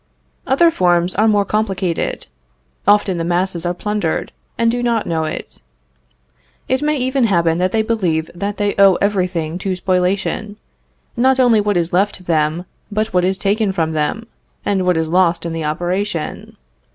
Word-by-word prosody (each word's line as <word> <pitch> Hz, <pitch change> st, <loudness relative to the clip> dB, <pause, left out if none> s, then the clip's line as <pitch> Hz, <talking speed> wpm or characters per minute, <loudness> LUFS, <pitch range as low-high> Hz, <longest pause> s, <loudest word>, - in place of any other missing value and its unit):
Other 330 Hz, +6 st, +4 dB
forms 175 Hz, -, +2 dB
are 215 Hz, +3 st, +2 dB
more 205 Hz, -2 st, +3 dB
complicated. 195 Hz, -5 st, -2 dB, 0.6 s
Often 205 Hz, -3 st, +3 dB
the -, -, -1 dB
masses 175 Hz, 0 st, -1 dB
are 175 Hz, -, 0 dB
plundered, 205 Hz, -3 st, -2 dB, 0.3 s
and 230 Hz, 0 st, +2 dB
do 245 Hz, +1 st, -2 dB
not 235 Hz, -2 st, 0 dB
know 160 Hz, -1 st, -1 dB
it. 155 Hz, -, -6 dB, 1.1 s
It 260 Hz, +1 st, 0 dB
may 300 Hz, 0 st, +1 dB
even 260 Hz, 0 st, +1 dB
happen 170 Hz, -5 st, +2 dB
that 185 Hz, +1 st, +1 dB
they 220 Hz, -1 st, +1 dB
believe 180 Hz, -8 st, -1 dB
that 200 Hz, +3 st, -4 dB
they 205 Hz, -1 st, 0 dB
owe 195 Hz, -2 st, +7 dB
every 200 Hz, -2 st, +1 dB
thing 165 Hz, -1 st, -4 dB
to 190 Hz, 0 st, -2 dB
spoliation, 190 Hz, +3 st, -1 dB, 0.6 s
not 260 Hz, +2 st, +3 dB
only 240 Hz, -4 st, +4 dB
what 205 Hz, -2 st, 0 dB
is 170 Hz, 0 st, -1 dB
left 190 Hz, 0 st, 0 dB
them 160 Hz, +1 st, 0 dB, 0.3 s
but 215 Hz, +2 st, -1 dB
what 180 Hz, -1 st, +3 dB
is 190 Hz, +1 st, +1 dB
taken 205 Hz, +1 st, +1 dB
from 165 Hz, -3 st, -1 dB
them, 155 Hz, +9 st, -2 dB, 0.4 s
and 190 Hz, -2 st, 0 dB
what 180 Hz, -2 st, +3 dB
is 160 Hz, 0 st, -1 dB
lost 175 Hz, -1 st, +2 dB
in 165 Hz, -, -3 dB
the 165 Hz, -1 st, -3 dB
operation. 175 Hz, +2 st, -3 dB
190 Hz, 170 wpm, -18 LUFS, 170-210 Hz, 1.1 s, owe